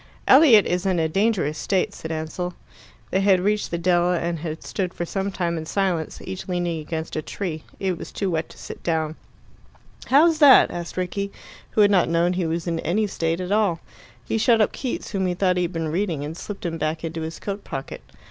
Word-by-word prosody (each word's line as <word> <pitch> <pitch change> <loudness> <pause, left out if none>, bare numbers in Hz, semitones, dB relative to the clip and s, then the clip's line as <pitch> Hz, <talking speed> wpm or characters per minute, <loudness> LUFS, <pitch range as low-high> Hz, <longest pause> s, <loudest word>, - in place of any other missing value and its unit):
"Elliot 260 -7 +7
is 180 +2 -1
in 185 -2 +1
a 160 -1 +2
dangerous 190 -4 0
state," 190 -2 0
said 160 - -7
Ansell. 160 +3 -4 0.6
They 190 - +2
had 195 -2 +4
reached 210 +3 0
the 170 - -2
dell, 175 0 +2
and 170 -1 -1
had 160 0 -5
stood 185 -3 -3
for 175 - -3
some 195 +3 -2
time 170 -3 -1
in 160 - -7
silence, 180 -5 -1
each 190 0 -6
leaning 175 -3 -1
against 160 +1 -5
a 155 - -1
tree. 160 -1 -5
It 185 -3 -1
was - - -8
too 195 -2 -2
wet 160 -1 -2
to - - -15
sit - - -9
down. 160 -2 -1 0.9
"How's 315 +4 +5
that?" 285 -4 +8
asked 175 +1 -6
Rickie, 200 +2 -2 0.4
who 215 - +4
had 205 0 +6
not 185 -4 +3
known 170 +2 +2
he 180 -2 -1
was 165 +1 -2
in 165 -2 -1
any 195 +8 0
state 165 -4 -1
at 185 +1 -4
all. 205 -6 +2 0.5
He 225 - -1
shut 230 +1 +4
up 215 - +3
Keats, 255 - -4
whom 190 -2 0
he 180 - -1
thought 180 0 +2
he - - +2
had 175 - -5
been 165 -2 -2
reading, 165 -4 -1
and 155 +2 -6
slipped 200 +1 -7
him 165 -1 -3
back 155 +1 -2
into 165 0 -4
his 160 +1 -5
coat 200 0 -5
pocket. 135 0 -6
180 Hz, 220 wpm, -23 LUFS, 165-195 Hz, 0.9 s, that